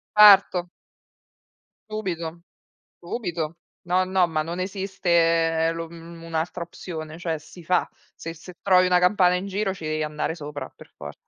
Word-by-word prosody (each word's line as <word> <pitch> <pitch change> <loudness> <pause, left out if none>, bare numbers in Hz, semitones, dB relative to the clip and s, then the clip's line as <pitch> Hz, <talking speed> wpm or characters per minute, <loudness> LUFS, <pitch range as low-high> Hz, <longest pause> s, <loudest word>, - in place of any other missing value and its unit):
Certo. 195 -4 +7 1.2
Subito, 170 -6 -4 0.6
subito. 170 -5 -3 0.3
No, 180 +1 +2
no, 185 -1 +2
ma 155 -2 -1
non 170 +3 -5
esiste 170 -4 +1
lo, 165 0 -5
mhmm, 170 0 -11
un'altra 165 +1 -3
opzione, 160 -2 -8
cioè 165 -2 -2
si 170 +3 -14
fa. 180 +3 +1 0.3
Se 165 0 -7
se 175 +2 -12
trovi 185 -2 +5
una 180 0 +4
campana 180 -1 +4
in 190 +2 -3
giro 195 0 -1
ci 165 -4 -9
devi 155 0 -1
andare 150 +2 -2
sopra 145 -2 -7
per - - -16
for 75 0 -8
170 Hz, 150 wpm, -24 LUFS, 165-185 Hz, 1.2 s, Certo